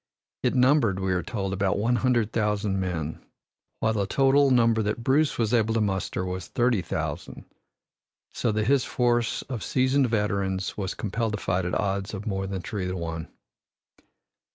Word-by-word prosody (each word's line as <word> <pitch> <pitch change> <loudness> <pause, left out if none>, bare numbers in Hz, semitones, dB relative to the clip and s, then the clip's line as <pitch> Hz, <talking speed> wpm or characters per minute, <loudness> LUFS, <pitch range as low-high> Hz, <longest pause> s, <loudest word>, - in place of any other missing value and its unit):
It - - +1
numbered, 125 -6 +3
we 95 -1 0
are 90 - 0
told, 95 +1 -3
about 95 0 0
one 120 +4 +1
hundred 120 -4 +1
thousand 105 -2 0
men, 80 -5 -3 0.6
while 110 0 +2
the 100 -3 0
total 135 +3 +4
number 115 -3 +4
that 105 +2 -2
Bruce 140 +4 +2
was 115 -1 0
able 115 -1 +2
to - - +2
muster 95 -3 -1
was 90 -1 -4
thirty 120 -4 +1
thousand, 85 - -5 0.9
so 115 - -1
that 105 0 0
his 135 +1 +3
force 120 -2 0
of 125 -5 -5
seasoned 130 0 +2
veterans 100 -3 -1
was 95 -3 -3
compelled 110 +1 -2
to 105 - -2
fight 90 -2 -1
at 90 - -1
odds 100 0 -2
of 100 - -7
more 95 -2 -2
than 95 -2 -4
three 95 -4 -3
to 90 0 -3
one. 85 -1 -4
105 Hz, 175 wpm, -26 LUFS, 95-120 Hz, 0.9 s, total